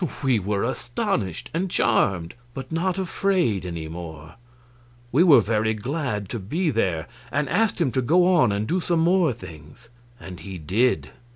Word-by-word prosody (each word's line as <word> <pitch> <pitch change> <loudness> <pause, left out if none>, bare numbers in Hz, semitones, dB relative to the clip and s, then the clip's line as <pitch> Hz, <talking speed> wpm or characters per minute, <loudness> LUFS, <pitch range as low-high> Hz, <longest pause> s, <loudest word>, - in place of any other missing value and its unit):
We 130 -5 +3
were 100 +1 -1
astonished 115 -6 -2
and 180 +4 -1
charmed, 95 - +1 0.2
but 130 +1 -7
not 175 +3 0
afraid 180 - 0
any 85 -2 -5
more; 80 -1 -8 0.8
we 145 - +4
were 150 -9 +7
very 110 0 0
glad 120 -3 -3
to 120 - -4
be 155 - -1
there, 90 - 0 0.3
and 145 +1 0
asked 205 +7 +1
him 145 -7 +2
to 130 - 0
go 170 +8 +4
on 125 - +4
and 100 +2 -1
do 180 - +1
some 170 -1 0
more 175 -2 +3
things. 95 0 -12 0.3
And 90 -1 -9
he 95 -2 -7
did. 105 +11 0
115 Hz, 165 wpm, -24 LUFS, -, 0.8 s, were